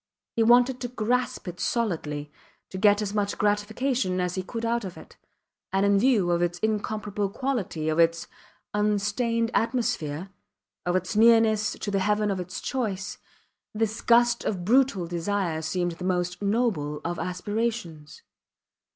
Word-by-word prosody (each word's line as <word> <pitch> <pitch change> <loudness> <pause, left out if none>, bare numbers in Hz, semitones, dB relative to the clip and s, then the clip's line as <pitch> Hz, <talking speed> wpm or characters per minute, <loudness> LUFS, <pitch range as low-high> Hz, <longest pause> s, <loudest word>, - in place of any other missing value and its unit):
He 230 - +1
wanted 245 +2 +4
to 245 - -2
grasp 245 -1 -1
it 175 -1 -6
solidly, 155 -11 -2 0.4
to 190 - -5
get 205 +1 +4
as 205 -1 -4
much 205 -1 -1
gratification 210 0 0
as 180 -1 -1
he 185 - -2
could 230 +5 -5
out 235 0 0
of 185 -2 -7
it; - - -13 0.6
and 195 +1 +2
in 200 0 +4
view 215 -7 +3
of 170 0 +1
its 175 0 0
incomparable 210 0 -2
quality, 215 - -2
of 155 +1 0
its 165 0 +3 0.5
unstained 210 +3 0
atmosphere, 200 - -1 0.6
of 175 - +1
its 185 +2 -1
nearness 220 -1 +5
to 205 - -5
the 195 - +1
heaven 210 +1 +1
of 190 - -2
its 180 +1 -6
choice, 205 -7 -3 0.6
this 220 0 -1
gust 240 0 +4
of 180 -4 -2
brutal 245 -5 +3
desire 175 -1 -1
seemed 175 +3 -1
the 170 +2 -8
most 180 0 -1
noble 200 -9 0
of 175 0 -2
aspirations. 180 -3 -3
205 Hz, 150 wpm, -26 LUFS, 180-230 Hz, 0.6 s, nearness